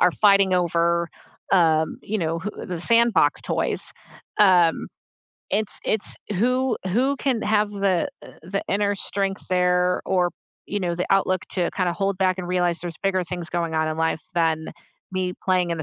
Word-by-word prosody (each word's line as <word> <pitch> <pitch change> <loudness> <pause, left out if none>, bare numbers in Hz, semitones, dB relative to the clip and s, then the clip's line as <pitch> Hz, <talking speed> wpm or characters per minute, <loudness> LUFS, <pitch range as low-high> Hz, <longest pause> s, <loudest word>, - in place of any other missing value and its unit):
are 180 -1 +5
fighting 195 -2 +4
over, 170 -1 +1 0.4
um, 160 -4 +3
you 215 +1 -2
know, 165 -2 -1
who 195 +5 -4 0.2
the 180 -3 -4
sandbox 235 +4 +3
toys, - - -1 0.5
um, 180 -5 +4 0.6
it's 210 0 0
it's 215 -1 -1 0.2
who 250 +3 +1
who 255 +9 +1
can 255 -4 -1
have 210 -1 +1
the, 195 -4 0 0.2
uh, - - -12
the 195 +4 -3
inner 205 0 +1
strength 195 0 -3
there 180 0 +2
or, 180 -2 +2 0.4
you 205 - -3
know, 175 -2 -1
the 180 - -2
outlook 185 -2 +2
to 180 -2 0
kinda 180 -3 +1
hold 195 +2 -1
back 185 -1 +1
and 180 - -4
realize 175 -2 +1
there's 170 -2 -6
bigger 185 -2 +1
things 175 -2 -4
going 170 -1 -2
on 155 0 +1
in 155 - -3
life 160 -1 0
than 160 -2 +1 0.5
me 185 -1 -2
playing 180 -2 +2
in 170 - -1
the 160 - -3
185 Hz, 175 wpm, -23 LUFS, 170-200 Hz, 0.6 s, are